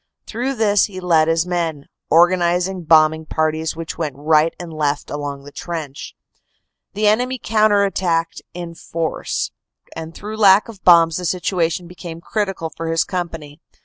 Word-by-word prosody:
Through 255 Hz, +4 st, -3 dB
this 210 Hz, -3 st, +3 dB
he 190 Hz, -4 st, -8 dB
led 165 Hz, -4 st, +3 dB
his 165 Hz, +1 st, +2 dB
men, 165 Hz, -5 st, -2 dB, 0.2 s
organizing 175 Hz, +1 st, +2 dB
bombing 155 Hz, 0 st, +4 dB
parties, 155 Hz, 0 st, -1 dB
which 165 Hz, 0 st, -6 dB
went 150 Hz, -5 st, -2 dB
right 155 Hz, +2 st, +3 dB
and 175 Hz, -2 st, -7 dB
left 150 Hz, -2 st, -2 dB
along 145 Hz, -1 st, -5 dB
the 145 Hz, -, -12 dB
trench. 155 Hz, -4 st, -6 dB, 0.8 s
The 210 Hz, +1 st, 0 dB
enemy 250 Hz, +5 st, +2 dB
counter 215 Hz, -3 st, +3 dB
attacked 170 Hz, -4 st, -1 dB
in 175 Hz, -1 st, -6 dB
force, 165 Hz, -1 st, -3 dB, 0.4 s
and 160 Hz, 0 st, -7 dB
through 215 Hz, +2 st, -7 dB
lack 200 Hz, 0 st, +6 dB
of 215 Hz, -4 st, -12 dB
bombs 165 Hz, -2 st, +6 dB
the 180 Hz, -, -4 dB
situation 175 Hz, -1 st, -1 dB
became 175 Hz, -2 st, -9 dB
critical 195 Hz, -3 st, -3 dB
for 165 Hz, -, -5 dB
his 165 Hz, 0 st, +2 dB
company. 165 Hz, -5 st, -5 dB
170 Hz, 150 wpm, -20 LUFS, 160-190 Hz, 0.8 s, lack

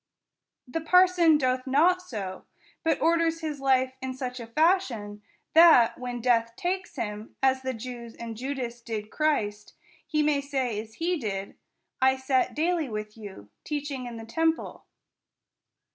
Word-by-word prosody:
The 325 Hz, +6 st, -3 dB
parson 355 Hz, -1 st, +5 dB
doth 255 Hz, -1 st, 0 dB
not 340 Hz, +7 st, +4 dB
so, 200 Hz, -, -6 dB, 0.4 s
but 325 Hz, -, +1 dB
orders 330 Hz, 0 st, +2 dB
his 305 Hz, -3 st, -4 dB
life 260 Hz, -1 st, +2 dB
in 260 Hz, 0 st, -4 dB
such 250 Hz, -1 st, -5 dB
a 230 Hz, -, -7 dB
fashion, 235 Hz, -, +1 dB, 0.3 s
that, 320 Hz, -8 st, +7 dB
when 245 Hz, -1 st, -5 dB
death 230 Hz, -1 st, +2 dB
takes 370 Hz, +4 st, -3 dB
him, 210 Hz, +1 st, -5 dB
as 265 Hz, 0 st, +3 dB
the 260 Hz, -1 st, -3 dB
Jews 235 Hz, 0 st, -8 dB
and 230 Hz, -1 st, -7 dB
Judas 245 Hz, -1 st, -4 dB
did 220 Hz, -2 st, -5 dB
Christ, 210 Hz, -10 st, -1 dB, 0.3 s
he 305 Hz, -2 st, +1 dB
may 295 Hz, -1 st, +2 dB
say 265 Hz, -6 st, -2 dB
as 220 Hz, 0 st, -14 dB
he 350 Hz, +2 st, 0 dB
did, 200 Hz, -5 st, -4 dB, 0.5 s
I 265 Hz, 0 st, +5 dB
sat 260 Hz, 0 st, 0 dB
daily 325 Hz, 0 st, +1 dB
ivith 215 Hz, -2 st, -6 dB
you 195 Hz, -, -11 dB
teaching 285 Hz, -4 st, -4 dB
in 235 Hz, -1 st, -7 dB
the 225 Hz, -, -8 dB
temple. 325 Hz, +7 st, -1 dB
260 Hz, 150 wpm, -27 LUFS, 230-315 Hz, 0.5 s, that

